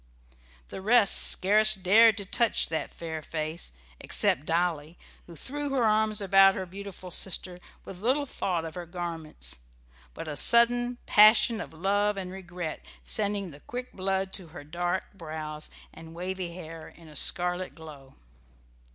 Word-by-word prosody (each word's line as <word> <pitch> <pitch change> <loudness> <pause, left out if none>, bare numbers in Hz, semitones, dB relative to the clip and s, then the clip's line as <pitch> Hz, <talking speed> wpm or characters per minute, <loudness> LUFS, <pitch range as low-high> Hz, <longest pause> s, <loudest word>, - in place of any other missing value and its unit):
The - - -8
rest 215 0 +4
scarce 215 +3 +5
dared 210 +4 +5
to 200 - -3
touch 230 +3 +1
that 160 0 -3
fair 160 -2 -6
face, 155 - -4 0.3
except 145 - +2
Dolly, 165 -1 -1 0.3
who 170 - -11
threw 290 - -5
her 270 -3 0
arms 215 -1 +2
about 195 0 +5
her 190 - -4
beautiful 185 0 -9
sister, 180 0 0 0.3
with 185 -1 -10
little 265 +6 +1
thought 180 -10 -3
of 160 - -7
her 175 0 -7
garments, 165 - -5 0.6
but - - -7
a 150 - -5
sudden 240 - +3
passion 215 +1 +5
of - - -8
love 200 +5 0
and 185 -2 -5
regret 180 -3 -7 0.2
sending 200 -3 -1
the 140 - -12
quick 250 +9 -7
blood 190 0 -2
to 185 - -6
her 160 -2 -11
dark 175 +4 -2
brows 155 -4 -7 0.2
and 160 0 -12
wavy 180 0 -4
hair 165 -2 -9
in 165 -1 -14
a 150 - -13
scarlet 180 +1 +1
glow. 150 -4 -13
185 Hz, 150 wpm, -27 LUFS, 165-205 Hz, 0.6 s, scarce